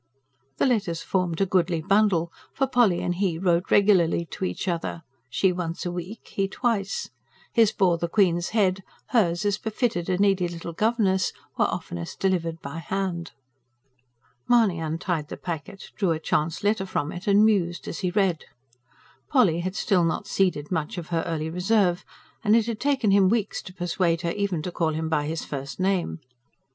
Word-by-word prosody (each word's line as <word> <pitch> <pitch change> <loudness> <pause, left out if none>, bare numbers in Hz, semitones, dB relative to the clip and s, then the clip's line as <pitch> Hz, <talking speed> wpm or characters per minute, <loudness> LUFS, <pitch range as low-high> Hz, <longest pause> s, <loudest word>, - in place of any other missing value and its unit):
The - - +2
letters 200 -10 0
formed 180 -2 -1
a - - +4
goodly 180 -2 +1
bundle; 190 -2 +2 0.2
for 270 - +2
Polly 240 -9 +3
and 175 - 0
he 180 -2 0
wrote 175 0 +1
regularly 185 -5 +4
to - - -6
each 185 - -4
other, 170 -1 -2 0.3
she 185 +9 +2
once 175 -1 -4
a 175 - -1
week, 180 +6 -7
he 195 -1 -1
twice. 240 - -1 0.4
His 225 -3 +5
bore 180 -4 +2
the 170 - -1
Queen's 175 -2 +2
head; 195 -4 +1 0.3
hers, 195 -6 +2
as 205 0 +1
befitted 215 -5 -1
a 180 - +1
needy 195 -2 +3
little 170 0 -7
governess, 205 -2 +1 0.2
were - - +3
oftenest 85 -1 -5
delivered 170 -4 0
by 140 +4 -5
hand. 175 -1 -3 1.1
Mahony 225 -8 +4
untied 160 0 -2
the - - -7
packet, 175 +3 -6
drew 195 -4 0
a 160 -1 +1
chance 160 +2 -1
letter 205 -2 +1
from 145 -4 -2
it 175 +3 -8
and 205 +1 +6
mused 180 -6 +1
as - - -5
he 185 - 0
read. 185 -4 +1 0.8
Polly 165 -2 +4
had 185 +2 -3
still 190 -5 +2
not 165 - -1
ceded 180 -6 0
much 165 +4 -2
of 170 -3 -6
her 165 -2 0
early 160 -1 -2
reserve 180 0 +2 0.4
and 215 0 +4
it 230 -2 +3
had 230 -2 -3
taken 270 -7 +2
him 195 -1 +5
weeks 215 -1 0
to - - -10
persuade 175 -2 0
her 170 - 0
even 195 -5 -2
to 180 - -4
call 160 -2 0
him 160 +1 -2
by 150 -2 0
his 160 0 -3
first 140 +2 -6
name. 185 - 0
180 Hz, 180 wpm, -25 LUFS, 165-200 Hz, 1.1 s, and